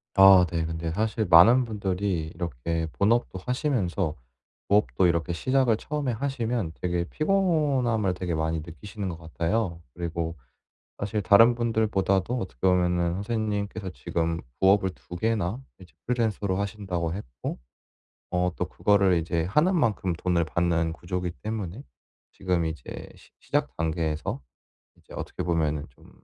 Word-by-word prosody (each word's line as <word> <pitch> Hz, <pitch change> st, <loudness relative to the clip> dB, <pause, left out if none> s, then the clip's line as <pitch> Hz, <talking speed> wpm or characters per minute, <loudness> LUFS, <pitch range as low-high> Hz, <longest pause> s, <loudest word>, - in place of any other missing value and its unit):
아 95 Hz, -2 st, +8 dB
네. 85 Hz, -1 st, 0 dB
근데 80 Hz, 0 st, -3 dB
사실 110 Hz, +3 st, 0 dB
많은 115 Hz, +10 st, +7 dB
분들이 95 Hz, -6 st, -2 dB
이렇게 80 Hz, +1 st, -3 dB
본업도 105 Hz, -2 st, +2 dB
하시면서 100 Hz, -, 0 dB, 0.6 s
부업도 100 Hz, -2 st, +3 dB
이렇게 85 Hz, 0 st, +1 dB
시작을 130 Hz, -, +2 dB
처음에 145 Hz, -1 st, -2 dB
하시면 120 Hz, -, -2 dB
되게 85 Hz, -1 st, 0 dB
피곤함을 145 Hz, -, +1 dB
되게 90 Hz, -2 st, -3 dB
많이 80 Hz, 0 st, -1 dB
느끼시는 95 Hz, +4 st, -6 dB
것 85 Hz, -, -7 dB
같아요. 85 Hz, +2 st, -2 dB
그리고 85 Hz, -1 st, -3 dB, 0.6 s
사실 105 Hz, +1 st, -2 dB
다른 115 Hz, +5 st, +6 dB
분들보다도 110 Hz, -1 st, +1 dB
어떻게 75 Hz, -, -7 dB
보면은 90 Hz, -1 st, +2 dB
선생님께서 105 Hz, -1 st, -2 dB
지금 85 Hz, -1 st, -2 dB, 0.2 s
부업을 95 Hz, 0 st, +4 dB
2 90 Hz, 0 st, -10 dB
개나 110 Hz, +2 st, -1 dB, 0.2 s
이제 85 Hz, -5 st, -15 dB
프리랜서로 110 Hz, -5 st, 0 dB
하신다고 95 Hz, -5 st, -2 dB
했고 65 Hz, -12 st, -6 dB, 0.7 s
어 90 Hz, 0 st, +1 dB
또 -, -, -1 dB
그거를 100 Hz, -3 st, +3 dB
이제 85 Hz, 0 st, 0 dB
하는 155 Hz, -, +3 dB
만큼 105 Hz, -, +1 dB
돈을 85 Hz, 0 st, 0 dB
받는 85 Hz, 0 st, 0 dB
구조기 90 Hz, +1 st, -4 dB
때문에 110 Hz, +1 st, -4 dB, 0.5 s
지금 90 Hz, -3 st, -1 dB
이제 80 Hz, 0 st, -7 dB
시 -, -, -19 dB
시작 -, -, -1 dB
단계에서 80 Hz, -3 st, -2 dB, 0.6 s
이제 -, -, -16 dB
어떻게 -, -, -5 dB
보면은 80 Hz, -3 st, 0 dB
좀 -, -, -20 dB
95 Hz, 315 characters per minute, -26 LUFS, 85-110 Hz, 0.7 s, 아